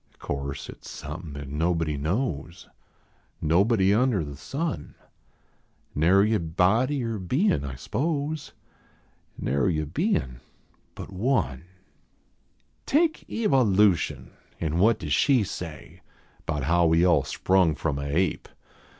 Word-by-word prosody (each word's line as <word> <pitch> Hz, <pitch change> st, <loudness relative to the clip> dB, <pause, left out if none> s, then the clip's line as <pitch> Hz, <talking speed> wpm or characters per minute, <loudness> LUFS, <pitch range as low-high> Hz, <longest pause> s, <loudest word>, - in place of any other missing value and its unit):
() -, -, -33 dB
course 70 Hz, 0 st, -5 dB
at -, -, -10 dB
s -, -, -14 dB
somepin 75 Hz, -1 st, -7 dB
at 75 Hz, -, -7 dB
nobody 80 Hz, +1 st, 0 dB
knows 80 Hz, -, -3 dB, 0.7 s
Nobody 95 Hz, +5 st, +3 dB
under 115 Hz, -5 st, +2 dB
the 70 Hz, -1 st, -8 dB
sun; 140 Hz, -, -4 dB, 1.0 s
Nary 95 Hz, +8 st, +4 dB
a 110 Hz, -, +2 dB
body 110 Hz, -, +1 dB
or 115 Hz, -2 st, -3 dB
bein, 110 Hz, -, +1 dB
I 70 Hz, -2 st, -5 dB
s 65 Hz, -, -11 dB
pose; 150 Hz, 0 st, -2 dB, 0.9 s
Narv 70 Hz, +4 st, +1 dB
a 75 Hz, -, -2 dB
bein 110 Hz, -, -1 dB, 0.6 s
but -, -, -8 dB
One. 95 Hz, -, 0 dB, 1.2 s
Take 315 Hz, +2 st, +1 dB
Kva 225 Hz, -9 st, 0 dB
I 130 Hz, -1 st, +5 dB
v 105 Hz, -1 st, +4 dB
ution, 85 Hz, -4 st, -3 dB, 0.3 s
an 80 Hz, 0 st, -1 dB
what 110 Hz, +3 st, +4 dB
does 75 Hz, -8 st, -3 dB
she 130 Hz, -, +4 dB
say 90 Hz, -5 st, -8 dB, 0.5 s
Bout 75 Hz, -4 st, -2 dB
how 85 Hz, +4 st, +3 dB
we 80 Hz, +2 st, +4 dB
all 85 Hz, -6 st, +4 dB
sprung 90 Hz, +3 st, +2 dB
from 75 Hz, -2 st, -2 dB
a 70 Hz, -, -4 dB
ape 85 Hz, +4 st, 0 dB
90 Hz, 135 wpm, -26 LUFS, 75-115 Hz, 1.2 s, I